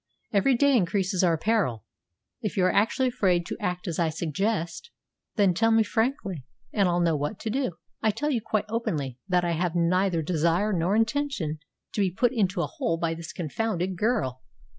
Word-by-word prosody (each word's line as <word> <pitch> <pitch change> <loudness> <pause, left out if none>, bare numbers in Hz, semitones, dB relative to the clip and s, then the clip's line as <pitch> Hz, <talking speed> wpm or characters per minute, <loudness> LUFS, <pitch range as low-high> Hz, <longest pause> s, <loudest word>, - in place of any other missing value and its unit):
Every 210 +6 +4
day 280 +2 +4
increases 190 -2 +1
our 170 -2 +3
peril. 175 - 0 0.6
If 210 -2 -3
you 185 - +4
are 185 - +3
actually 250 +5 +2
afraid 185 -8 +1
to - - -5
act 180 -2 -3
as 170 -1 -2
I 165 -2 +2
suggest, 170 - -2 0.5
then 200 -4 +4
tell 225 +6 +2
me 225 0 +5
frankly 220 - -1 0.3
and 200 -4 +3
I'll 175 0 +1
know 165 -2 +2
what 150 +7 -3
to 220 - -2
do. 255 -5 -1 0.3
I 220 - +3
tell 295 +8 -1
you 240 -5 0
quite 215 -1 -1
openly 150 - -2
that 180 -2 +2
I 170 - 0
have 170 +1 -1
neither 175 0 +2
desire 170 +5 +1
nor 180 +3 +1
intention 225 - 0 0.3
to 210 - 0
be 195 - +3
put 240 +7 +1
into 195 -6 +1
a - - +1
hole 255 - -2
by 165 -1 -1
this 165 -1 -7
confounded 185 +2 -2
girl. 175 - 0
185 Hz, 190 wpm, -26 LUFS, 170-225 Hz, 0.6 s, me